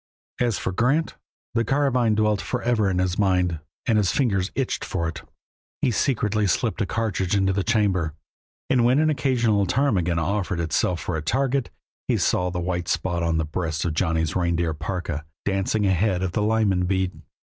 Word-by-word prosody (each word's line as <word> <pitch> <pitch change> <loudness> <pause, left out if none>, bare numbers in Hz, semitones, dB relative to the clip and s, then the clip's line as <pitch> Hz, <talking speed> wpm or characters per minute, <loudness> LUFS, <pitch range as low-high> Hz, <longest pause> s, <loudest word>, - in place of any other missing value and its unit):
As 120 -4 +1
for - - -2
Grant, 130 - +1 0.4
the 115 0 +2
carbine 125 -3 +2
dwelt 105 -1 +2
forever 120 -4 0
in 95 - -1
his 90 0 0
mind, 90 -4 +2 0.3
and 110 -2 +3
his 95 -4 +2
fingers 100 -8 +1
itched 135 -2 -1
for 85 -3 -2
it. 85 - -5 0.6
He - - +1
secretly 105 -3 +1
slipped 115 +4 0
a 100 - 0
cartridge 105 -4 -1
into 95 -1 +2
the 100 0 0
chamber, 95 -9 +1 0.5
and 125 -2 +3
when 125 +3 +4
an 155 +1 +3
occasional 120 -8 +1
ptarmigan 95 -9 +1
offered 90 +1 -1
itself 85 +1 0
for - - -3
a - - -3
target 135 - 0 0.4
he - - +2
saw 90 0 +1
the 90 0 -3
white 90 -1 -2
spot 85 0 -1
on 85 -1 +1
the 80 - 0
breast 80 0 -3
of 85 - 0
Johnny's 80 -2 0
reindeer 85 -2 +1
parka, 80 -1 -4 0.2
dancing 100 +2 0
ahead 95 0 +1
of 95 - -1
the 105 - -1
Lyman 105 -4 +2
bead. 95 -1 -1
95 Hz, 180 wpm, -24 LUFS, 85-115 Hz, 0.6 s, when